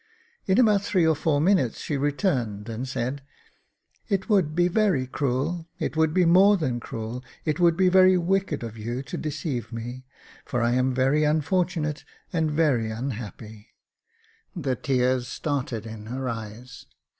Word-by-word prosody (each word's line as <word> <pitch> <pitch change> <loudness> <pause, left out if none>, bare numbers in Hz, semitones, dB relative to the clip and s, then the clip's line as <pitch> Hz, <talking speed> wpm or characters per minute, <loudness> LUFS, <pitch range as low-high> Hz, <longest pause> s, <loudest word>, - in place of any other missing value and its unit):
In 190 +3 +3
about 210 -5 +4
three 185 -4 +1
or 160 -1 +3
four 145 -1 +1
minutes 170 - +2
she 150 - -3
returned 135 - -1
and 115 +4 -4
said, 130 +2 -3 0.4
" - - -42
It 195 +1 -1
would 180 -8 +2
be 175 0 +3
very 185 -8 +2
cruel 145 +6 -2
— - - -43
it - - -2
would 160 -1 +3
be 180 +2 +3
more 195 +4 +6
than 130 -8 -1
cruel 115 +2 -6
— - - -28
it 155 +1 -1
would 170 -2 +4
be 185 0 +4
very 185 0 +6
wicked 180 -4 0
of 115 -1 -7
you 120 +4 -4
to - - -7
deceive 140 -6 -4
me, 120 +2 -6 0.4
for 120 -2 -2
I 120 - +2
am 130 +1 +2
very 135 +4 +2
unfortunate 155 0 0 0.3
and 160 -2 +1
very 145 -8 +1
unhappy." 110 -2 -7 0.8
The 140 -7 -1
tears 125 -1 0
started 130 -6 -3
in 110 -1 -8
her 130 +2 -4
eyes. 115 +2 -7
140 Hz, 165 wpm, -25 LUFS, 120-170 Hz, 0.8 s, more